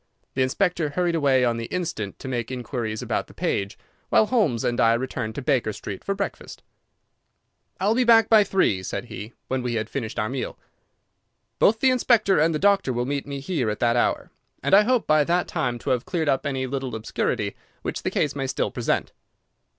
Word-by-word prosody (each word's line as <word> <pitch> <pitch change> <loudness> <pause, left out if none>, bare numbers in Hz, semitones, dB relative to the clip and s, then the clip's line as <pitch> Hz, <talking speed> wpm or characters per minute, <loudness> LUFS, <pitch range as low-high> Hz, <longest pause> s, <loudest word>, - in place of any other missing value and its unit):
The 130 - -1
inspector 160 +4 +1
hurried 175 +3 0
away 135 -5 +3
on 120 -1 +1
the 115 - -4
instant 165 - -4
to - - -9
make 120 -3 -2
inquiries 120 -3 -4
about - - -2
the - - -17
page, 100 0 -2 0.3
while 220 - +5
Holmes 205 - +1
and 120 - 0
I 115 0 +5
returned 115 -3 -3
to 140 - -5
Baker 125 -6 +1
Street 100 -1 -7
for 195 - -1
breakfast. 200 0 -5 1.2
"I'll 205 +3 +2
be 255 +2 +2
back 225 -2 +6
by 220 -2 +6
three," 185 - +1
said 95 - -4
he, 105 +5 -8
when 130 0 -1
we 120 -1 -2
had 110 0 -3
finished 115 -6 -4
our 105 - 0
meal. 130 +2 -4 1.0
"Both 220 +2 +4
the 265 - +5
inspector 230 -7 +3
and 160 +2 +3
the 155 - 0
doctor 195 -5 +3
will 120 0 -1
meet 140 +1 -3
me 140 -1 -5
here 140 -7 -1
at 105 - -3
that 120 0 +3
hour, 120 - 0 0.3
and - - 0
I 200 - +9
hope 250 0 +2
by 155 -1 +4
that 175 +3 +1
time 120 -2 -1
to 120 - -3
have 125 -2 +1
cleared 165 -4 -2
up 135 +1 +1
any 135 -2 -2
little 130 -2 -4
obscurity 110 0 -2 0.3
which - - -3
the - - -1
case 145 - 0
may 135 -1 -2
still - - -1
present." - - -1
135 Hz, 205 wpm, -24 LUFS, 120-180 Hz, 1.2 s, I